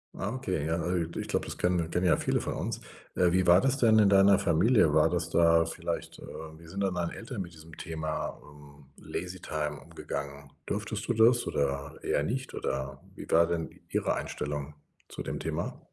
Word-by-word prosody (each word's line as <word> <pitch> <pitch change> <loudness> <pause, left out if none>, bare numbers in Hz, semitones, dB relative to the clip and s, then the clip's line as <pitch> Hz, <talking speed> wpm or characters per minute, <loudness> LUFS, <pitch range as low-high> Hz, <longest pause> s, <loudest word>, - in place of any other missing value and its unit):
Ah, 100 +3 -3
okay. 95 - -2
Ja, 80 +1 0
äh, 90 -2 0
ich - - -4
glaube, - - -1
das - - -6
kennen 90 -2 +1
kennen 90 +1 +1
ja 85 - +4
viele - - 0
von - - -3
uns. - - -3 0.4
Äh, 90 -1 +3
wie 95 0 +2
war 90 +2 +7
das 135 0 +2
denn 110 -4 +5
in 100 -2 +6
deiner 100 0 +6
Familie? 95 - +4
War 80 0 +5
das 85 -1 -1
da 85 -1 +5
vielleicht, 80 - -4
äh - - -11 0.3
wie 85 - -15
sind 95 +4 -5
denn 95 -2 0
deine 85 -1 -2
Eltern 115 -2 -6
mit 85 -1 -12
diesem 80 0 -13
Thema, 80 -1 -4
ähm, 75 -1 -16
Lazy 90 +1 -6
time 75 -3 -3
umgegangen? 70 0 -7
Durftest 105 +1 -3
du 120 - +2
das 120 +2 +5
oder 70 0 -2
eher 70 - +1
nicht? 130 - -3
Oder, 65 0 -3
wie - - -9
war 85 +1 +5
denn 80 -2 -2 0.2
Ihre - - 0
Einstellung 75 0 -4 0.4
zu - - -7
dem - - -4
Thema? - - -3
85 Hz, 200 wpm, -29 LUFS, 75-100 Hz, 0.4 s, war